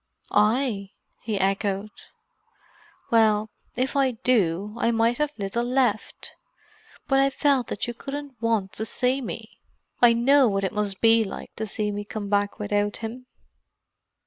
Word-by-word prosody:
"I?" 210 -2 +1 0.3
he 215 -2 -3
echoed. 195 +1 -1 1.2
"Well, 215 -2 +3 0.2
if 255 +3 -1
I 275 -1 +3
do, 210 -4 +1
I - - +1
have 235 - +2
mighty 235 +6 +2
little 205 +3 -2
left. 255 +1 -1 0.7
But 270 -1 +3
I 275 0 +4
felt 275 -3 +1
that - - -3
you 240 - -4
couldn't 275 -1 -7
want 225 -5 0
to 220 - -4
see 255 +5 0
me. 245 - -8 0.4
I 240 -1 +7
know 265 +3 +4
what 195 -2 0
it 190 - -1
must 205 -2 -2
be 225 0 +5
like 195 - -8
to 220 - -3
see 210 +1 -2
me 205 0 -4
come 205 -1 -6
back 205 0 0
without 205 0 -1
him." 250 +3 -8
220 Hz, 150 wpm, -25 LUFS, 205-250 Hz, 1.2 s, I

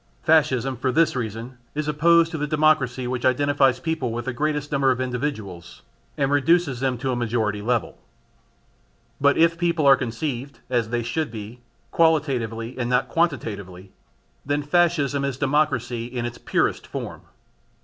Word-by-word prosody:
Fascism 135 -5 +2
for 130 - 0
this 160 +2 +2
reason 120 +1 -5 0.2
is 150 0 -2
opposed 165 +2 +4
to 165 - -3
the 150 - -1
democracy 150 -5 +2
which 125 0 -3
identifies 135 0 +2
peoples 135 -5 -2
with 120 0 -4
the 130 - -2
greatest 150 +2 -2
number 140 -2 +2
of 130 -1 +1
individuals 120 - -4 0.3
and 140 -1 +1
reduces 145 -2 +2
them 130 -1 0
to 130 +2 -2
a - - -1
majority 110 -3 -1
level. 120 +1 -1 1.2
But 140 0 +4
if 165 +1 +3
people 170 -3 +1
are 135 -1 +8
conceived, 130 +2 -4
as 120 -3 +1
they 120 0 -1
should 155 +7 -2
be, 110 +2 -9 0.3
qualitatively 130 -8 +1
and 120 -1 -1
not 125 +1 +1
quantitatively, 100 - -2 0.5
then 145 +1 -1
Fascism 145 -3 +1
is 140 -2 -2
democracy 130 -5 0
in 120 -1 -4
its 120 0 -6
purest - - 0
form. - - -6
130 Hz, 155 wpm, -23 LUFS, 120-150 Hz, 1.2 s, are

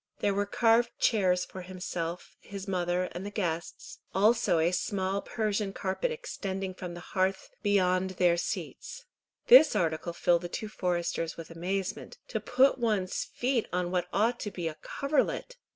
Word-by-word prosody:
There 200 - +1
were 200 +1 0
carved 230 +2 +3
chairs 185 -5 +2
for 185 - -9
himself, 180 -2 -5
his 200 -1 -8
mother, 180 -1 0
and 175 - -6
the 205 - -4
guests, 170 -5 -4 0.2
also 215 -2 +4
a 165 +2 +3
small 190 +1 -1
Persian 210 -3 -1
carpet 195 - -1
extending 195 - -4
from 180 -1 -7
the - - -7
hearth 190 0 0
beyond 190 -3 +2
their 175 -1 +4
seats. 480 - -5 0.4
This 470 - +8
article 170 -2 0
filled 170 0 +2
the 175 - -5
two 215 +4 -4
foresters 175 -4 -2
with 165 -1 -8
amazement. 185 +3 -3
To - - -1
put 265 +2 +3
one's 210 -6 0
feet 245 -2 -1
on 180 0 -1
what 180 -1 0
ought 230 +5 +1
to 210 - -3
be 175 -4 -4
a 155 -1 -5
coverlet! 300 - -1
190 Hz, 160 wpm, -29 LUFS, 175-215 Hz, 0.4 s, This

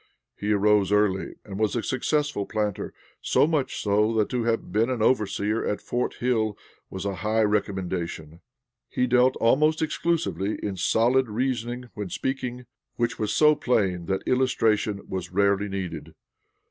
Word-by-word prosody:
He 105 +1 -2
arose 105 -1 +3
early 105 -2 +1
and 100 -1 -7
was 110 +1 +1
a 120 - -1
successful 145 -4 -1
planter; 105 -3 -2 0.3
so - - +3
much 145 -5 -1
so 105 +2 +2
that 110 -2 +1
to 125 -3 -1
have 115 -1 -1
been 110 +4 +2
an 125 -4 -1
overseer 105 -2 +1
at 105 - -1
'Fort 120 +1 -2
Hill' 115 -4 0 0.3
was 95 0 -6
a 100 -2 -2
high 110 +1 +1
recommendation. 90 -6 -2 0.5
He 125 - 0
dealt 125 +1 +3
almost 150 +7 +3
exclusively 160 - -1
in 100 -2 -2
solid 120 +6 +2
reasoning 120 +1 -2
when 105 -3 -5
speaking, 125 0 -3 0.3
which 120 0 -1
was 105 -2 -1
so 150 0 +5
plain 100 - 0
that 95 0 -1
illustration 110 -5 +1
was 95 -2 -5
rarely 100 +1 +2
needed. 90 -5 -5
110 Hz, 150 wpm, -25 LUFS, 100-125 Hz, 0.5 s, so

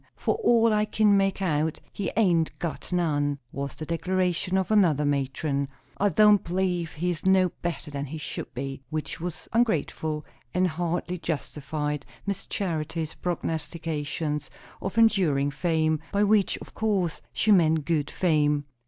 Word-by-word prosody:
"For - - 0
all 230 - +4
I 210 0 +3
kin 210 -1 +3
make 195 0 +1
out, 155 -2 0
he 200 - -2
hain't 175 -7 +2
got 170 +1 -5
none," 145 -5 +1
was 140 0 -4
the 155 - -6
declaration 180 +2 0
of 190 +2 0
another 170 -9 +4
matron. 140 0 0 0.3
"I 205 - +2
don't 210 +2 +5
b'lieve 180 -2 -1
he's 175 +1 -2
no 190 -1 +4
better 170 -3 -3
than 140 0 -3
he 160 +4 -6
should 150 - -5
be." 135 +1 -4
Which 155 +1 -4
was 170 -2 -5
ungrateful, 160 -8 0 0.3
and 185 0 +3
hardly 175 +1 -2
justified 150 -2 -3 0.2
Miss 200 -1 -3
Charity's 165 -4 -2
prognostications 155 -3 -3 0.3
of 195 +3 -4
enduring 175 -11 +4
fame; 160 0 +1
by 205 0 +2
which, 205 -1 +3
of - - -11
course, 195 -7 0
she 220 - +2
meant 160 -5 +4
good 155 -4 0
fame. 150 -4 +2
165 Hz, 145 wpm, -26 LUFS, 150-190 Hz, 0.3 s, don't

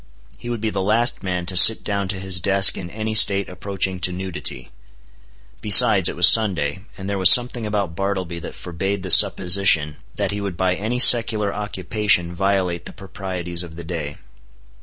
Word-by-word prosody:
He 120 - -10
would 120 -3 -6
be 110 -1 -3
the 95 - -4
last 110 +5 -2
man 90 -2 -5
to 90 +1 -5
sit 110 +5 +7
down 100 -2 -4
to 95 0 -5
his 95 -1 -2
desk 100 +2 +3
in 85 - -9
any 110 +3 -6
state 100 -2 +4
approaching 95 0 -5
to 90 +1 -1
nudity. 95 0 -7 0.9
Besides, 105 -3 +5
it - - -8
was 90 0 +6
Sunday; 90 -7 +2 0.2
and 95 -1 -9
there 100 -1 -4
was 95 -1 +5
something 120 -1 +2
about 100 -5 -5
Bartleby 95 -3 -5
that 85 - -11
forbade 95 +3 -6
the 95 - -3
supposition 90 -7 +2 0.2
that - - -4
he 100 0 -6
would 100 -4 -7
by 95 0 -1
any 110 +6 -5
secular 115 -4 +4
occupation 100 -3 -2
violate 95 -2 -3
the - - -12
proprieties 90 -3 -8
of 85 -2 -12
the 85 - -10
day. 80 -4 -8
95 Hz, 180 wpm, -19 LUFS, 90-105 Hz, 0.9 s, sit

